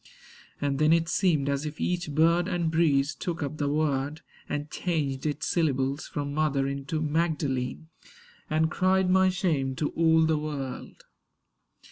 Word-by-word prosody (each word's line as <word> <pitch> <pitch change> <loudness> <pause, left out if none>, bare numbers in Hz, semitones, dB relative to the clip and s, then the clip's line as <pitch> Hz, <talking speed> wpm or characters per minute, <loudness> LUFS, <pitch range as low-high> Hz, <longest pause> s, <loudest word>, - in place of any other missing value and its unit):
And 140 -1 -1
then 155 +1 +4
it 165 0 +3
seemed 165 -7 +1
as 140 0 0
if 150 0 -6
each 180 -2 -1
bird 170 +3 +3
and 170 -3 -1
breeze 150 -3 +2
Took 165 +2 -4
up 145 +2 -4
the 145 -1 0
word, 145 0 -1 0.3
and 145 0 -3
changed 150 -6 -2
its 150 - -2
syllables 140 -4 0
From 145 -1 -4
Mother 145 -3 +1
into 140 +3 -3
Magdalene; 155 -3 -1 0.6
and 160 +1 +1
cried 185 0 +2
My 190 0 +5
shame 160 -8 0
to 150 +2 -1
all 160 -1 +3
the 160 -1 +1
world. 140 -4 -6
155 Hz, 150 wpm, -27 LUFS, 140-165 Hz, 0.6 s, My